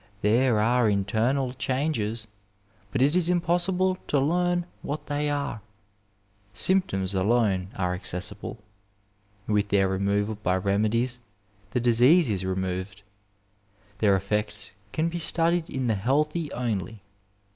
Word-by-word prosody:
There 115 +2 +3
are 120 +1 +3
internal 115 +6 0
changes, 130 -5 -1 0.7
but 130 -1 +2
it 145 +4 +3
is 180 -1 +2
impossible 180 +2 +1
to 145 - +2
learn 175 +4 +1 0.2
what 150 +2 -5
they 145 0 -1
are; 140 -6 -2 0.9
symptoms 115 - +1
alone 95 -1 +2
are 90 -2 -1
accessible; 90 0 -4 0.9
with 105 -1 +1
their 100 -1 +3
removal 100 +2 0
by 95 -3 +1
remedies 110 +6 0 0.5
the 125 - 0
disease 125 +5 +4
is 95 -2 -2
removed. 95 +1 -3 1.0
Their 100 -3 +4
efEects 105 +2 -1 0.2
can 160 +6 0
be 170 +1 -3
studied 170 0 +1
in 130 -1 -2
the 115 - +2
healthy 150 - 0
only. 110 -4 -3
115 Hz, 120 wpm, -26 LUFS, 100-150 Hz, 1.0 s, disease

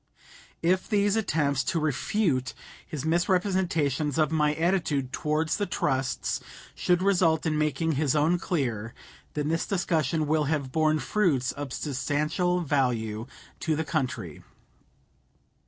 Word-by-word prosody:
If 185 +2 +1
these 205 -1 +2
attempts 150 - +1
to 180 -3 0
refute 150 - 0 0.3
his 150 -2 -5
misrepresentation 170 -4 +1
of 155 -1 +3
my 150 -1 +2
attitude 160 -6 0
towards 155 +2 0
the 205 -1 -1
trusts 135 -6 -1 0.3
should 180 0 +1
result 175 -5 +3
in 155 -1 +1
making 155 +2 0
his 150 -1 +1
own 160 +4 +3
clear, 120 - -2 0.4
then 150 0 -1
this 165 +1 0
discussion 160 -5 0
will 155 0 +1
have 145 -3 -1
borne 155 +1 +2
fruits 150 -9 +1
of 145 -2 -6
substantial 155 +6 0
value 120 -7 0 0.3
to 160 -2 0
the 160 +1 -2
country. 145 -6 -3
155 Hz, 125 wpm, -27 LUFS, 140-175 Hz, 0.4 s, of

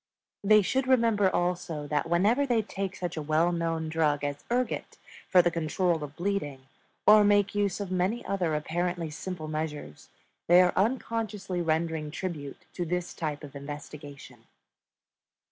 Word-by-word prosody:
They 215 +1 +6
should 260 +6 0
remember 230 -6 +4
also 175 -4 -2
that 150 +2 -1
whenever 205 +11 +3
they 235 -4 +2
take 195 -2 -4
such 175 -2 -4
a - - -1
well 155 +3 +2
known 165 -2 -1
drug 155 -2 +1
as 145 0 -3
ergot 245 +1 -2 0.3
for 180 -2 +6
the 175 - +2
control 165 0 0
of 145 0 -8
bleeding, 175 -8 -2 0.4
or 210 0 +8
make 205 -1 +3
use 205 -2 0
of 200 -2 -4
many 185 +6 0
other 180 -5 0
apparently 170 +1 -2
simple 160 0 -6
measures, 150 - -5 0.4
they 175 +1 +7
are 180 -1 +4
unconsciously 210 -4 -1
rendering 160 -1 -1
tribute 155 -4 -6
to 180 - -3
this 175 +1 -3
type 150 -2 -4
of 145 -1 -10
investigation. 145 -2 -9
175 Hz, 150 wpm, -28 LUFS, 155-200 Hz, 0.4 s, or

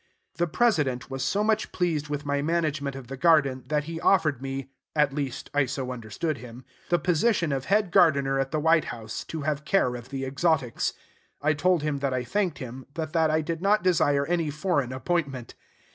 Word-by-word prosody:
The 175 0 +1
President 150 - +1
was 135 0 -3
so 200 +10 +1
much 215 0 +1
pleased 160 -5 -1
with 145 0 -3
my 145 0 0
management 155 -3 -1
of 135 -2 -8
the 135 +3 -7
garden, 140 -4 +3
that 150 -1 0
he 165 +2 -6
offered 155 -9 +3
me 135 0 -5 0.2
(at 150 -2 +3
least, 140 -4 -4
I 145 -2 +2
so 130 -1 -3
understood 125 +5 -3
him) 120 +1 -11 0.2
the 175 - +4
position 175 +1 +1
of 135 -1 -2
head 200 -1 +2
gardener 140 -6 +4
at 135 0 0
the 155 - -1
White 160 +1 +3
House, 110 -2 -6
to 160 - -5
have 150 0 -1
care 150 -6 +2
of 120 +1 -8
the 135 -1 -3
exotics. 140 -2 0 0.5
I 155 +2 +2
told 165 +2 +2
him 150 -2 -1
that 135 -2 -1
I 125 - -1
thanked 185 +2 -1
him, 130 0 -8
but 160 -1 -4
that 160 -1 +3
I 155 +1 +2
did 165 +2 -4
not 205 +2 +3
desire 145 -6 +3
any 170 -1 0
foreign 145 -4 0
appointment. 135 -3 -2
150 Hz, 200 wpm, -26 LUFS, 135-165 Hz, 0.5 s, the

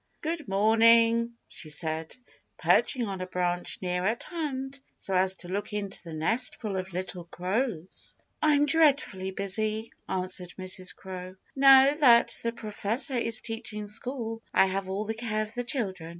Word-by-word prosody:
"Good 320 -2 -3
morning," 230 +3 +4
she 155 - -9
said, 160 +1 -2 0.4
perching 250 -4 +3
on 195 -3 -5
a 185 - -4
branch 180 -1 -1
near 180 0 -1
at 220 +5 -1
hand 275 -5 -5 0.2
so 195 - -3
as 190 +1 +3
to 180 - -12
look 200 +3 -4
into 205 -2 -3
the 170 - -10
nestful 215 +5 -1
of 190 0 -4
little 180 -1 -5
crows. 185 +1 -3 0.3
"I'm 295 -1 +4
dreadfully 285 -11 +3
busy," 215 +3 0 0.2
answered 185 -1 -1
Mrs. 185 0 -3
Crow. 185 -1 -8 0.2
"Now 270 0 +7
that 250 -6 +5
the 230 - -1
Professor 230 +4 -1
is 230 -2 +1
teaching 225 -2 -5
school, 225 +1 -5
I - - +6
have 190 0 -2
all 200 +3 -2
the 220 - -2
care 220 -1 -2
of 215 +1 -10
the 245 - -3
children. 195 - -3
215 Hz, 155 wpm, -28 LUFS, 185-240 Hz, 0.4 s, Now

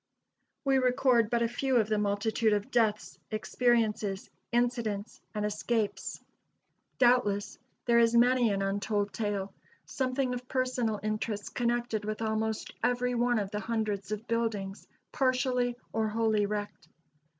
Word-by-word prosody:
We 270 -1 +4
record 250 -3 +3
but 235 0 +2
a - - +2
few 260 +3 -1
of 220 -3 +4
the 215 -1 +1
multitude 210 +2 +1
of 205 0 -2
deaths, 220 -3 +1
experiences, 215 -3 0 0.2
incidents 235 -3 -1
and 210 0 -1
escapes. 210 +1 -2 0.8
Doubtless, 240 -5 +2 0.3
there 235 -1 +5
is 230 0 +4
many 245 0 +5
an 195 0 0
untold 205 +1 -1
tale 200 -3 -2 0.3
something 255 -1 -1
of 250 0 -6
personal 255 -5 0
interest 215 -1 -3
connected 240 -2 0
with 215 +1 -3
almost 220 0 -2
every 250 0 +1
one 240 0 +2
of 200 -2 -2
the 210 - -2
hundreds 215 -3 -2
of 215 +1 -3
buildings 215 -4 -2 0.2
partially 255 -2 +1 0.2
or 220 0 +1
wholly 215 -1 +1
wrecked. 205 0 -5
225 Hz, 135 wpm, -30 LUFS, 210-245 Hz, 0.8 s, there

